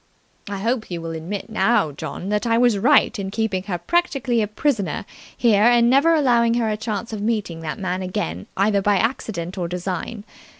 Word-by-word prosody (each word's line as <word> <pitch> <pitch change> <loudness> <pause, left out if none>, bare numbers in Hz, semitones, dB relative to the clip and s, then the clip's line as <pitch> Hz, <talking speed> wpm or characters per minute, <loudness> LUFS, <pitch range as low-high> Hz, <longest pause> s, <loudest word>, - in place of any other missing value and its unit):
I 200 - -3
hope 230 +3 -1
you 175 -2 -4
will 165 0 -5
admit 165 +5 -5
now, 220 -8 +2
John, 175 +6 -6
that 210 +2 0
I 230 0 +3
was 240 -4 +3
right 235 +1 +4
in 195 -1 -3
keeping 210 -2 -1
her 185 -4 -2
practically 265 - 0
a 210 - 0
prisoner 215 -1 -1 0.3
here 220 -4 +3
and 240 0 +5
never 285 +5 +5
allowing 235 -6 +3
her 230 -2 +1
a - - 0
chance 220 0 -4
of 210 - -4
meeting 210 -7 -2
the 160 -2 -4
man 185 -1 -3
again 95 - -4
either 200 +1 +2
by 205 0 +2
accident 190 -5 -2
or 175 - -1
design. 180 +4 -4
210 Hz, 195 wpm, -22 LUFS, 185-235 Hz, 0.3 s, and